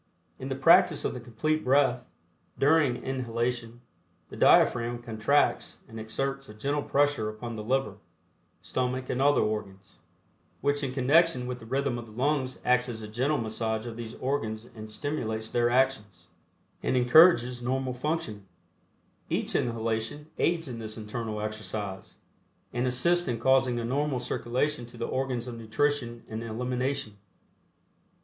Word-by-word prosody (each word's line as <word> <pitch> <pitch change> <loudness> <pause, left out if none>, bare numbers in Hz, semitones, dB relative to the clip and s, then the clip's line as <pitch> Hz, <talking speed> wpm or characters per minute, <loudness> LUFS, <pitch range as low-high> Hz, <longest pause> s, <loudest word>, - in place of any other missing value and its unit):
In - - -5
the - - -1
practice - - +5
of - - 0
the 125 - -6
Complete 135 +7 -1
Breath, 130 -2 +2 0.5
during 145 -3 +3
inhalation, 120 -2 -2 0.5
the - - -9
diaphragm 120 0 +4
contracts 115 +5 +1
and 110 - -9
exerts 135 +5 -3
a 105 - -10
gentle 140 +6 -1
pressure 145 -6 +1
upon 115 +2 -6
the 105 - -5
liver, 120 -4 0 0.7
stomach 130 0 -2
and 130 - -1
other 145 +1 +4
organs, 100 -3 -4 0.6
which 145 0 0
in 135 -3 -2
connection 140 +1 +3
with 125 0 -4
the 115 - -12
rhythm 135 -1 -1
of 115 - -9
the - - -13
lungs 130 +1 0
acts 125 0 +3
as 110 -2 -6
a - - -6
gentle 130 +8 0
massage 110 0 -2
of 115 -2 -6
these 115 0 -7
organs 115 -5 -2
and 110 -1 -9
stimulates 110 -3 -3
their 120 0 +2
actions, 110 -9 0 0.5
and 130 - +1
encourages 125 -2 +6
normal 130 +1 -1
functioning. 125 -7 -3 0.8
Each - - -1
inhalation 115 +5 -2
aids 170 -2 +1
in 120 -3 -6
this 110 -1 -6
internal 110 0 -4
exercise, 105 -2 -5 0.6
and 125 +1 0
assists 170 +8 +2
in 120 -3 -1
causing 130 -1 +3
a 115 - -3
normal 140 +2 0
circulation 125 +2 -2
to 120 - -14
the 115 - -2
organs 130 -2 -2
of 120 -2 -6
nutrition 120 0 -1
and 110 +1 -5
elimination. 125 0 -2
125 Hz, 150 wpm, -28 LUFS, 110-135 Hz, 0.8 s, encourages